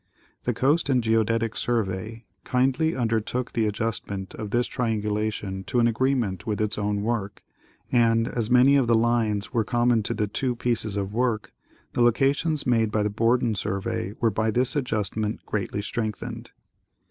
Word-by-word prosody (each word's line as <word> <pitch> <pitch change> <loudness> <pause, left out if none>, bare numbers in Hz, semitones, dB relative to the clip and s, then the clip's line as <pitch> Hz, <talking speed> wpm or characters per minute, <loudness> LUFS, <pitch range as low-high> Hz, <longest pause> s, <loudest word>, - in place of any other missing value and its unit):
The - - +1
Coast 145 +4 +2
and 125 -3 +2
Geodetic 115 0 +1
Survey 110 0 -2 0.2
kindly 135 +5 +1
under 115 -3 +1
took 125 +3 -3
the 115 -2 +1
adjustment 105 -3 -3
of 105 - -6
this 120 +3 +1
triangulation 105 -4 -2
to 125 - 0
an 120 - +4
agreement 115 -6 0
with 105 -2 -1
its 105 -1 -1
own 105 0 -1
work, 105 -3 -3 0.5
and, 115 -1 +3
as 115 -3 -2
many 130 +3 +6
of 130 -3 +2
the 115 - +4
lines 110 -2 +1
were 115 -3 +2
common 120 +1 +2
to 105 - -2
the 105 0 0
two 125 +4 -2
pieces 115 -3 -1
of 100 0 -3
work, 115 -2 -1 0.4
the - - 0
locations 140 +6 +2
made 115 -3 +2
by 105 -1 0
the 105 - 0
Borden 115 +2 +2
Survey 100 -1 -3
were 115 -2 +2
by 110 +2 0
this 125 +5 +1
adjustment 110 -5 -2
greatly 100 0 -3
strengthened. 110 -1 -4
115 Hz, 165 wpm, -25 LUFS, 105-120 Hz, 0.5 s, many